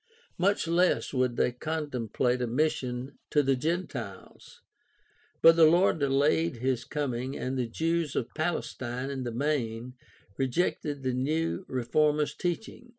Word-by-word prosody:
Much 195 0 +2
less 175 0 +2
would 125 -2 +1
they - - +2
contemplate 125 -4 -2
a 125 - 0
mission 130 -1 -1
to 150 - +3
the 135 0 +2
Gentiles. 130 - -5 0.8
But 165 0 +9
the 165 - +8
Lord 170 +1 +4
delayed 140 +3 +2
his 125 0 -1
coming 130 -3 -3
and 130 +1 -3
the 125 -2 -1
Jews 165 +2 -1
of 120 - -2
Palestine 135 -6 -3
in 130 -2 -4
the 120 - -2
main 125 -2 -2 0.4
rejected 145 +1 -1
the 130 -1 0
new 155 +8 -1
reformers' 150 +4 +1
teaching. 220 +7 -4
140 Hz, 135 wpm, -29 LUFS, 125-160 Hz, 0.8 s, But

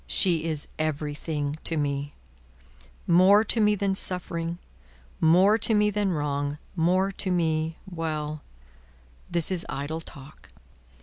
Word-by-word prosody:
She 170 -4 +1
is 155 -3 -1
everything 150 0 -3
to 165 - -2
me; 145 -1 -2 0.9
more 185 +5 +5
to 225 +1 +1
me 210 0 +3
than 195 -1 0
suffering, 175 -3 0 0.6
more 185 +7 +4
to 220 +1 +3
me 210 0 +3
than 205 -1 0
wrong, 145 -2 -2 0.2
more 185 +3 +1
to 190 0 -3
me 160 -2 0
Well! 155 -4 -4 0.9
This 170 0 +4
is 180 -2 0
idle 150 +4 -4
talk." 140 -1 -13
165 Hz, 125 wpm, -26 LUFS, 150-190 Hz, 0.9 s, more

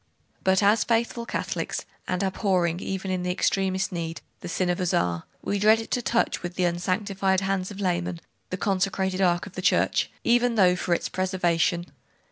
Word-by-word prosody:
'But 190 +1 +3
as 210 +2 +4
faithful 235 0 0
Catholics, - - -3 0.2
and 180 +1 -1
abhorring 185 -3 +1
even 190 0 -3
in 185 -1 -1
the 180 - -2
extremest 190 +1 0
need, 165 -2 -4 0.2
the - - -7
sin 180 +1 0
of 175 - -2
Uzzah, 90 - 0 0.2
we 200 - -1
dreaded 220 +2 +3
to 245 - +1
touch 235 0 0
with 175 0 -5
the 185 - 0
unsanctified 190 +2 0
hands 195 -1 -1
of 205 -1 -9
laymen 175 -2 -1 0.3
the 185 - -3
consecrated 190 0 0
ark 175 -2 +2
of 200 - -11
the 185 - -5
Church, 185 - +2
even 240 0 +3
though 185 -4 +5
for 175 -1 0
its - - -2
preservation.... 175 -2 0
185 Hz, 175 wpm, -26 LUFS, 180-200 Hz, 0.3 s, though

